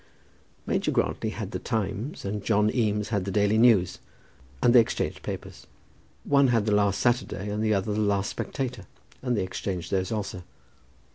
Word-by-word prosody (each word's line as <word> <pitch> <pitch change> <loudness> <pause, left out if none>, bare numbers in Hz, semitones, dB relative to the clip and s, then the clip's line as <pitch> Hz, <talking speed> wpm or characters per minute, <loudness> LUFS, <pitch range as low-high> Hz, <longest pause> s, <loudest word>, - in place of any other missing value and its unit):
Major - - 0
Grantly - - 0
had - - -5
The - - -3
Times, 110 +5 -3
and 100 +1 -3
John 105 -1 +2
Eames 105 -3 0
had 100 -4 0
the 100 - -4
Daily 105 +2 +2
News, 110 -7 +4 0.6
and 120 - +5
they 125 - +9
exchanged 115 - 0
papers. - - -7 0.6
One 140 -1 +4
had 115 -4 +2
the 110 - +1
last 100 -1 +2
Saturday, 120 -5 0
and 105 +1 -2
the 110 -1 +2
other 100 +2 -1
the 105 - -1
last 100 -2 +1
Spectator, 125 -8 -4 0.3
and 125 -3 0
they - - +1
exchanged 90 -1 -4
those 95 +1 0
also. 100 -4 -3
105 Hz, 170 wpm, -26 LUFS, 100-115 Hz, 0.6 s, they